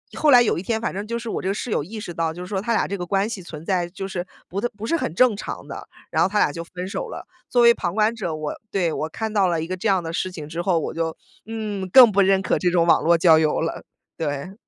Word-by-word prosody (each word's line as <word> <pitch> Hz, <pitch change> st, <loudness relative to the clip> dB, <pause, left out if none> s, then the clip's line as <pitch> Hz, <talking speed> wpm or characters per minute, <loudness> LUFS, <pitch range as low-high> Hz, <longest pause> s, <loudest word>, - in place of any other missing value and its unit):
后 310 Hz, -, +2 dB
来 245 Hz, -3 st, +8 dB
有 215 Hz, -, 0 dB
一 -, -, -4 dB
天 220 Hz, +4 st, -1 dB
反 230 Hz, -, -3 dB
正 200 Hz, +3 st, -5 dB
就 235 Hz, +1 st, -2 dB
是 235 Hz, -, -7 dB
我 -, -, -3 dB
这 -, -, -4 dB
个 195 Hz, -, +1 dB
室 230 Hz, -, -4 dB
友 -, -, 0 dB
意 215 Hz, +8 st, -8 dB
识 175 Hz, -4 st, -6 dB
到， 165 Hz, -1 st, -1 dB
就 165 Hz, -, -10 dB
是 -, -, -8 dB
说 190 Hz, 0 st, -2 dB
她 235 Hz, +3 st, -2 dB
俩 -, -, +1 dB
这 200 Hz, -, -3 dB
个 -, -, -3 dB
关 195 Hz, +3 st, +1 dB
系 220 Hz, -4 st, -5 dB
存 160 Hz, -2 st, -10 dB
在 180 Hz, -2 st, 0 dB
就 195 Hz, +1 st, -6 dB
是 185 Hz, -2 st, -4 dB, 0.2 s
不 195 Hz, +3 st, -4 dB, 0.2 s
不 210 Hz, -, -5 dB
是 335 Hz, -, +1 dB
很 330 Hz, -, -2 dB
正 250 Hz, +1 st, +4 dB
常 200 Hz, -, -7 dB
的， -, -, -8 dB, 0.2 s
然 -, -, +1 dB
后 -, -, +3 dB
他 210 Hz, -, -1 dB
俩 175 Hz, -, +3 dB
就 165 Hz, +3 st, -6 dB
分 180 Hz, +2 st, -7 dB
手 195 Hz, -, -4 dB
了。 -, -, -8 dB, 0.2 s
作 245 Hz, -1 st, +3 dB
为 235 Hz, 0 st, +8 dB
旁 175 Hz, -5 st, -3 dB
观 215 Hz, +1 st, +3 dB
者， 175 Hz, -8 st, -3 dB
我 155 Hz, -1 st, -4 dB, 0.2 s
对， 175 Hz, -6 st, 0 dB
我 155 Hz, -, -3 dB
看 220 Hz, +6 st, -4 dB
到 200 Hz, -3 st, +3 dB
了 165 Hz, -3 st, 0 dB
一 -, -, -3 dB
个 185 Hz, -, -3 dB
这 185 Hz, +5 st, -3 dB
样 190 Hz, -4 st, +2 dB
的 165 Hz, -, -5 dB
事 185 Hz, +2 st, -2 dB
情 155 Hz, -4 st, -8 dB
之 165 Hz, +2 st, -4 dB
后， 175 Hz, -1 st, +1 dB
我 160 Hz, -, -2 dB
就， 160 Hz, -1 st, -3 dB, 0.3 s
嗯， 210 Hz, -4 st, -4 dB
更 245 Hz, +2 st, +9 dB
不 200 Hz, 0 st, +3 dB
认 195 Hz, 0 st, +3 dB
可 -, -, +1 dB
这 180 Hz, -, +2 dB
种 175 Hz, -1 st, +2 dB
网 170 Hz, -, +4 dB
络 170 Hz, +1 st, +4 dB
交 165 Hz, -2 st, +6 dB
友 155 Hz, -1 st, +1 dB
了， 165 Hz, -, -3 dB, 0.3 s
对。 145 Hz, +2 st, -4 dB
185 Hz, 325 characters per minute, -23 LUFS, 170-215 Hz, 0.3 s, 更